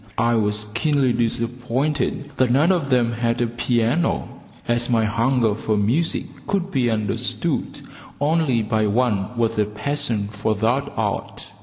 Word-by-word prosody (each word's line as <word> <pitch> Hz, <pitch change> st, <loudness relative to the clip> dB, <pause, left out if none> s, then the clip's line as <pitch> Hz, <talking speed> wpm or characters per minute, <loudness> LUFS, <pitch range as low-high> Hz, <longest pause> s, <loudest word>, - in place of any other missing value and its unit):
I 115 Hz, +1 st, +2 dB
was 105 Hz, -2 st, +1 dB
keenly 135 Hz, +1 st, +2 dB
disappointed 125 Hz, +5 st, -1 dB
that 130 Hz, -1 st, +3 dB
none 145 Hz, +9 st, +4 dB
of 170 Hz, -7 st, 0 dB
them 120 Hz, -3 st, +3 dB
had 115 Hz, 0 st, -1 dB
a 120 Hz, -, +2 dB
piano, 120 Hz, +6 st, 0 dB, 0.4 s
as 120 Hz, +1 st, +1 dB
my 115 Hz, -2 st, +3 dB
hunger 115 Hz, +1 st, +2 dB
for 110 Hz, 0 st, -1 dB
music 125 Hz, +12 st, +1 dB, 0.2 s
could 195 Hz, -1 st, -1 dB
be 125 Hz, -3 st, +1 dB
understood 110 Hz, -3 st, -2 dB, 0.4 s
only 145 Hz, -5 st, +2 dB
by 110 Hz, 0 st, +1 dB
one 110 Hz, -1 st, 0 dB
with 115 Hz, -2 st, 0 dB
a 105 Hz, -, +3 dB
passion 110 Hz, -1 st, -2 dB
for 110 Hz, +1 st, -1 dB
that 120 Hz, +7 st, 0 dB
art. -, -, -3 dB
120 Hz, 145 wpm, -22 LUFS, 110-135 Hz, 0.4 s, none